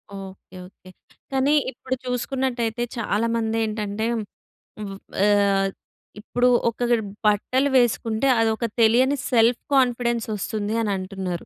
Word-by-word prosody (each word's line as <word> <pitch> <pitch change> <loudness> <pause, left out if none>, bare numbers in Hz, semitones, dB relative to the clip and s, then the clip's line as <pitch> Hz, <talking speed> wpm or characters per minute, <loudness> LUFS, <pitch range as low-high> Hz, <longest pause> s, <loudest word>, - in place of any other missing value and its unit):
Okay 195 -1 -11
okay. 185 -1 -18 0.4
కానీ 270 +2 +2 0.2
ఇప్పుడు 260 +1 -4
చూసుకున్నట్టయితే 250 -2 -2
చాలామందేంటంటే, 220 -1 -1 0.8
ఉవు 195 -2 -6 0.3
ఆహ్, 200 -1 +3 0.5
ఇప్పుడు 245 +3 0 0.2
ఒక 230 - -10 0.5
బట్టలు 255 +7 +2
వేసుకుంటే 230 0 +1
అదొక 225 +1 +1 0.2
తెలియని 250 +5 +4 0.2
సెల్ఫ్ 235 0 +3
కాన్ఫిడెన్సొస్తుంది 235 -4 0
అని 210 - -1
అంటున్నారు. 185 -2 -5
225 Hz, 95 wpm, -23 LUFS, 205-245 Hz, 0.8 s, తెలియని